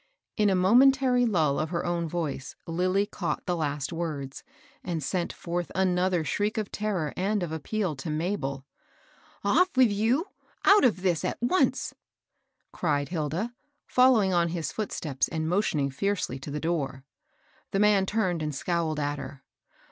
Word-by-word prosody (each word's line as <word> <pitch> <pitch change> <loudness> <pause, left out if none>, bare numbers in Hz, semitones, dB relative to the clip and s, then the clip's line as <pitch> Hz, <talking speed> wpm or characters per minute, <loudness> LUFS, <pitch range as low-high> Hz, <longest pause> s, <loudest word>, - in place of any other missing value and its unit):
In 210 -1 +3
a 190 - +3
momentary 250 +5 +5
lull 155 -9 +2
of 155 - -1
her 170 0 -2
own 170 -1 -1
voice, 150 -5 -4
Lilly 185 +4 +1
caught 190 -4 -4
the 180 - 0
last 145 -1 -2
words, 150 -5 -4 0.4
and 165 -4 -3
sent 175 +4 -1
forth 175 0 -4
another 180 -2 +2
shriek 210 +7 -1
of 215 -2 -2
terror 195 -8 -2
and 200 +1 0
of 170 - -4
appeal 170 +2 -2
to 135 +4 -5
Mabel. 150 -4 -2 0.4
" - - -30
Off 365 +1 +5
with 250 -4 +6
you! 230 - +1 0.2
— - - -16
out 405 +2 +7
of 215 -7 +2
this 175 -5 +1
at - - -2
once! 245 +11 +1 0.4
" - - -50
cried 145 -4 0
Hilda, 170 - -2 0.3
following 245 -7 +4
on 170 -1 +3
his 165 -4 -3
footsteps, 155 -10 -2
and 160 -1 -3
motioning 160 -7 +1
fiercely 185 -3 -2
to 135 - -8
the 150 +1 -3
door. 145 -5 -2 0.7
The 195 - -1
man 205 -2 +4
turned 185 -6 0
and 150 -2 -3
scowled 165 0 -1
at 145 0 -1
her. 135 0 -9
175 Hz, 165 wpm, -27 LUFS, 155-205 Hz, 0.7 s, out